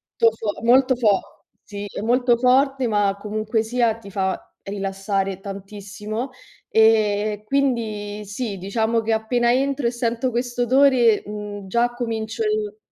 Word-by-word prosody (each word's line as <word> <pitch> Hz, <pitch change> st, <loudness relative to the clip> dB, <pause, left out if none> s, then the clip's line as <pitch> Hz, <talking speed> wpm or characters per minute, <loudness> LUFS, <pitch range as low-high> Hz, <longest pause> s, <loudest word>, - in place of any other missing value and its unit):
molto 230 Hz, -1 st, +4 dB
fo 220 Hz, -2 st, -4 dB
molto 255 Hz, +2 st, +5 dB
fo 215 Hz, -5 st, 0 dB, 0.2 s
sì, 205 Hz, 0 st, -7 dB
è -, -, -5 dB
molto 245 Hz, +1 st, +3 dB
forte, 260 Hz, +1 st, +3 dB
ma 205 Hz, -2 st, +1 dB
comunque 215 Hz, +2 st, -1 dB
sia 235 Hz, 0 st, +1 dB
ti 225 Hz, -3 st, -12 dB
fa 190 Hz, -1 st, -1 dB, 0.2 s
rilassare 195 Hz, -1 st, -2 dB
tantissimo. 205 Hz, +4 st, -6 dB, 0.4 s
Ehm, 215 Hz, -1 st, +3 dB
quindi 215 Hz, -5 st, -1 dB
sì, 205 Hz, 0 st, -4 dB
diciamo 220 Hz, +4 st, 0 dB
che 225 Hz, -, -2 dB
appena 235 Hz, +2 st, +1 dB
entro 275 Hz, +1 st, 0 dB
e 235 Hz, -, +2 dB
sento 240 Hz, +1 st, -1 dB
questo 240 Hz, +1 st, -2 dB
odore, 250 Hz, -3 st, +4 dB
mhmm, 205 Hz, -1 st, -7 dB
già 235 Hz, +4 st, +1 dB
comincio 230 Hz, -, -3 dB
il 425 Hz, -1 st, -1 dB
225 Hz, 140 wpm, -22 LUFS, 205-245 Hz, 0.4 s, molto